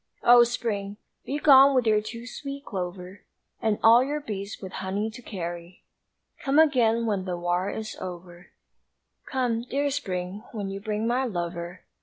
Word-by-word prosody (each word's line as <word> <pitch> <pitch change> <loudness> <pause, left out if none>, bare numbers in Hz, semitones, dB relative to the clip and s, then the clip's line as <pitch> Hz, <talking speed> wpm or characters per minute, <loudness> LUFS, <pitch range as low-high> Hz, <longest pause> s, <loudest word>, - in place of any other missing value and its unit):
O 240 0 +8
Spring! 210 -4 -3 0.3
begone 275 -1 +6
with 250 -2 +3
your 215 -1 +3
too 230 +2 -8
sweet 280 +3 -7
clover 180 0 -6 0.4
And 220 -2 +1
all 230 +2 +7
your 290 +3 -2
bees 205 -6 -6
with 190 -2 -8
honey 195 +3 -3
to 230 - -11
carry 175 -4 -7 0.6
Come 275 0 +1
again 240 -7 +4
when 200 -4 -1
the 180 -2 -3
war 175 +2 -1
is 220 0 -5
over, 175 0 -8 0.8
Come, 245 -3 0
dear 280 +4 -1
Spring, 190 -6 -4
when 200 -3 -4
you 195 - -5
bring 215 +1 -2
my 250 +3 +1
lover! 175 -4 -4
215 Hz, 155 wpm, -26 LUFS, 185-245 Hz, 0.8 s, O